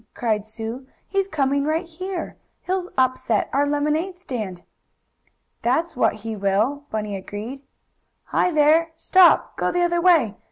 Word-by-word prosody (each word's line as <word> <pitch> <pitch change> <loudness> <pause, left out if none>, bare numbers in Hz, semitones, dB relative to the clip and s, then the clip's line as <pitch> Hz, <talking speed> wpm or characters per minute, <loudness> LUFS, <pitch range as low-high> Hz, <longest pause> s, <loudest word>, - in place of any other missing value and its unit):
cried 215 -3 -1
Sue, 225 +4 -6 0.2
"he's 390 -1 0
coming 280 -5 0
right 315 +4 0
here. 350 +1 -6 0.3
He'll 370 0 -2
upset 255 -4 +1
our 285 +1 +2
lemonade 300 +5 0
stand!" 215 - -6 1.0
"That's 315 +8 0
what 250 - +2
he 225 -1 -3
will," 210 +9 0
Bunny 210 -2 -3
agreed. 210 +7 -7 0.6
"Hi, - - +1
there! 320 +1 +3
Stop! 370 +1 +4
Go - - 0
the 355 0 +1
other 345 0 +1
way! 310 - +4
285 Hz, 135 wpm, -23 LUFS, 225-340 Hz, 1.0 s, Stop